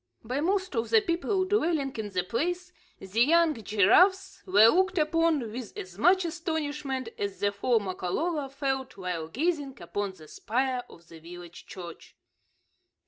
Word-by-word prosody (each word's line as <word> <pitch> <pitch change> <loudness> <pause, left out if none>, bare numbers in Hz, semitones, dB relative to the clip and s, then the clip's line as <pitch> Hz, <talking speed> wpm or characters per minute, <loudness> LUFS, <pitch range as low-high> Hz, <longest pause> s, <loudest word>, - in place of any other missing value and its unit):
By 250 +5 -2
most 375 +1 0
of 230 0 -1
the 455 - +6
people 375 0 0
dwelling 325 -8 0
in 215 -2 -4
the 185 -2 -1
place, 355 - -2 0.2
the 195 +4 -2
young 330 +4 +4
giraffes 365 - +3
were 205 +4 +7
looked 375 +5 +2
upon 310 -6 +1
with 240 -1 -8
as 185 +1 -8
much 365 - +4
astonishment 300 -6 -3
as 200 -1 -3
the 205 0 +1
four 225 +4 +1
Makololo 270 - -2
felt 270 -3 -3
while 180 -4 -4
gazing 285 - -2
upon 205 -1 -4
the 155 -4 -15
spire 250 - -2
of 170 -1 -16
the 165 -1 -13
village 175 +1 -11
church. 175 -3 -10
265 Hz, 150 wpm, -28 LUFS, 200-335 Hz, 0.2 s, were